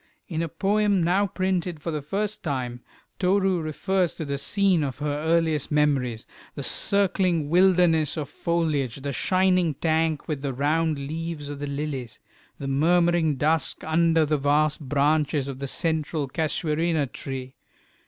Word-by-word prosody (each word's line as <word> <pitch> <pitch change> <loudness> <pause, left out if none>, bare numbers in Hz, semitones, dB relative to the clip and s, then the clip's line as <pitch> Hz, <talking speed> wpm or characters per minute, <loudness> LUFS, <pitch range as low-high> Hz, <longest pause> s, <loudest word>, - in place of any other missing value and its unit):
In 160 -2 -3
a 165 - -2
poem 205 +1 +1
now 190 +4 +2
printed 185 -3 -2
for 165 - -4
the 150 -1 -3
first 205 +8 -3
time, 125 -6 -3 0.4
Toru 190 -1 +2
refers 180 +3 -1
to 160 - -5
the 140 -1 -3
scene 190 +2 +2
of 135 -3 -3
her 145 0 -2
earliest 160 -2 +1
memories, 135 -6 +1 0.3
the - - -5
circling 185 -6 +2
wilderness 175 -4 +4
of 150 -3 -3
foliage, 150 -7 -1
the 140 -1 -3
shining 185 +3 +2
tank 160 0 0
with 150 -4 -3
the 140 -2 -3
round 155 +3 +1
leaves 155 +1 -5
of 145 -1 -6
the 145 - -4
lilies, 140 -5 -4 0.4
the 140 - -6
murmuring 165 +2 +2
dusk 155 +2 0
under 165 0 +3
the 150 -1 0
vast 145 +2 +2
branches 145 0 +1
of 135 -1 -6
the 140 - -4
central 155 -1 -1
casuarina 160 +1 0
tree. 130 0 -7
155 Hz, 150 wpm, -25 LUFS, 145-175 Hz, 0.4 s, wilderness